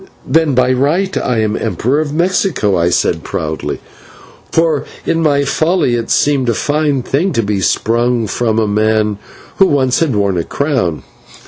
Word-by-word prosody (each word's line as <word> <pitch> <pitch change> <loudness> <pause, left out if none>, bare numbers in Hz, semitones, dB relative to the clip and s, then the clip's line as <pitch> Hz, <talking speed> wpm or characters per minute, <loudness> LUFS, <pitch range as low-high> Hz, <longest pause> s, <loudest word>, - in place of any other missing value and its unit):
"Then 160 -4 +2
by 130 0 +3
right 155 +9 0
I 115 -3 0
am 110 0 0
Emperor 120 +6 -1
of 155 -2 -2
Mexico," 170 - +1
I 85 0 +2
said - - 0
proudly, 80 0 -4 0.7
for 165 -3 +1 0.2
in 165 0 0
my 145 -3 +2
folly 155 0 +1
it 115 -1 -2
seemed 140 -4 +2
a 115 - +1
fine 145 -2 0
thing 170 +10 0
to 115 - 0
be 100 -1 -1
sprung 120 +4 +1
from 110 -1 0
men 110 -1 +1 0.4
who 195 - +5
once 130 -5 +1
had 155 -8 0
worn 100 -3 +1
a 85 - 0
crown. 125 - -2
125 Hz, 160 wpm, -15 LUFS, 110-150 Hz, 0.7 s, who